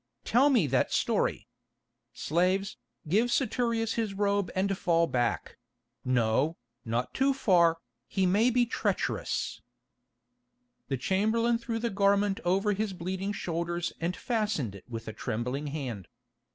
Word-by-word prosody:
"Tell 265 +5 +4
me 245 - +4
that 135 -2 +1
story. - - 0 0.6
Slaves, 185 +5 0 0.3
give 220 +9 +2
Saturius 235 -4 0
his 220 -4 -2
robe 200 -1 +1
and 195 +1 +1
fall 170 -2 +2
back—no, 120 +1 -1 0.3
not 120 +2 -2
too 270 0 +2
far, 175 -10 +4 0.3
he 190 - 0
may 205 +7 +4
be 245 0 +3
treacherous." 235 - -2 1.3
The 135 - -1
chamberlain 220 - +1
threw 235 -1 -3
the 230 0 -2
garment 200 0 +2
over 195 +4 +2
his 205 0 -2
bleeding 185 +3 -3
shoulders 170 -3 -2
and 175 +2 -1
fastened 210 - -1
it 100 - -12
with 115 -1 -6
a 110 - -5
trembling 125 +9 -3
hand. 130 - -5
185 Hz, 125 wpm, -29 LUFS, 140-215 Hz, 1.3 s, Tell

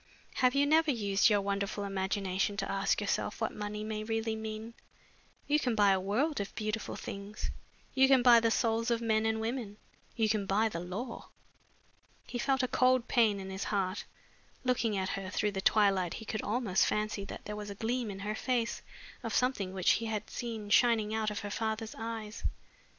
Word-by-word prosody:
Have 255 0 +3
you 280 +1 +4
never 315 +2 +4
used 205 -5 +3
your 205 -2 +3
wonderful 200 +1 -2
imagination 195 0 -1
to 195 - -2
ask 195 0 +1
yourself 205 +1 -1
what 220 - -1
money 210 0 -4
may 215 0 -3
really 225 0 -1
mean? 220 +1 -6 0.7
You 300 +1 +3
can 245 -5 0
buy 205 -2 +5
a 190 - +3
world 230 +11 0
of 200 - -6
beautiful 215 0 -3
things, 200 +2 -6 0.4
you 265 0 +5
can 265 -2 +5
buy 240 -2 +8
the 230 0 +2
souls 230 0 +1
of 235 -1 +2
men 220 -1 +1
and 220 0 0
women, 225 -2 -3 0.4
you 225 -2 +2
can 210 -2 0
buy 215 +3 +2
the 170 - -4
law." 200 +8 -6 1.0
He 245 - -5
felt 265 +1 +1
a - - +2
cold 255 -1 +3
pain 220 -4 +3
in 190 0 -6
his 190 +1 -4
heart. 195 -1 -1 0.6
Looking 235 -4 +1
at 190 -1 -1
her 195 -1 -4
through 210 +2 0
the 195 -1 -3
twilight 195 -4 +3
he 220 - -8
could 215 0 -3
almost 215 -4 +1
fancy 210 -1 -1
that - - -8
there 210 - -4
was 210 0 -6
a 200 - -6
gleam 230 +2 -1
in 195 -1 -6
her 210 +2 -2
face 235 0 -1 0.4
of - - -3
something 250 -7 +1
which 185 -1 +2
he 230 - +1
had 215 -1 -3
seen 225 -4 -5
shining 220 -3 +4
out 220 -1 0
of 210 - -4
her 205 -1 -5
father's 220 0 -2
eyes. 225 -1 -6
215 Hz, 195 wpm, -31 LUFS, 200-230 Hz, 1.0 s, buy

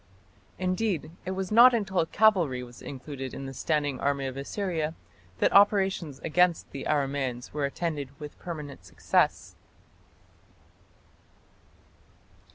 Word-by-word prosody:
Indeed, 185 -2 -1 0.2
it - - -1
was 190 0 -3
not 240 +3 +8
until 190 -6 +1
cavalry 175 -14 +3
was 120 0 -12
included 135 -1 -7
in 135 - -6
the 135 - -6
standing 145 -1 -1
army 140 -1 0
of 130 -1 -4
Assyria 160 +2 -3 0.4
that - - +2
operations 195 -7 +3
against 175 +1 +2
the 140 - -6
Aramaeans 135 -4 -1
were 145 -1 0
attended 145 -2 -4
with 150 -1 -9
permanent 150 -6 -7
success. - - 0
150 Hz, 115 wpm, -28 LUFS, 140-185 Hz, 0.4 s, not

